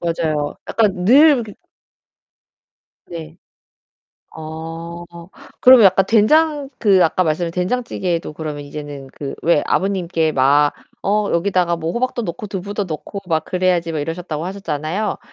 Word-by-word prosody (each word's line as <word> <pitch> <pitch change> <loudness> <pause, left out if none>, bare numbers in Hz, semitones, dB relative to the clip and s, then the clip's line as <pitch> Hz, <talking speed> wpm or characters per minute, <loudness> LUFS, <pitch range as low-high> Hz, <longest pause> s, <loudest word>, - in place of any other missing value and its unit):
맞아요. 155 -3 -1
약간 195 -5 +1
늘 275 +3 +6
그 210 - -10 1.5
네. 165 -1 -9 1.0
어 165 +2 -7 0.6
그러면 250 -4 +8
약간 190 0 +4
된장 290 +6 +3
그 195 -5 +4
아까 185 +3 +2
말씀하신 165 +2 -1
된장찌개에도 180 -4 -2
그러면 150 -2 -6
이제는 145 -1 -8
그 140 -2 -6
왜 165 -3 +3
아버님께 180 -5 0
막 145 +2 +3 0.3
"어 210 +1 +1
여기다가 175 -1 +1
뭐 165 0 -3
호박도 240 +3 -2
넣고 185 +1 -5
두부도 200 +1 -4
넣고 155 +4 -6
막 160 -2 0
그래야지." 180 -2 0
막 155 - -3
이러셨다고 165 +1 -4
하셨잖아요. 185 0 -3
175 Hz, 290 characters per minute, -19 LUFS, 160-200 Hz, 1.5 s, 그러면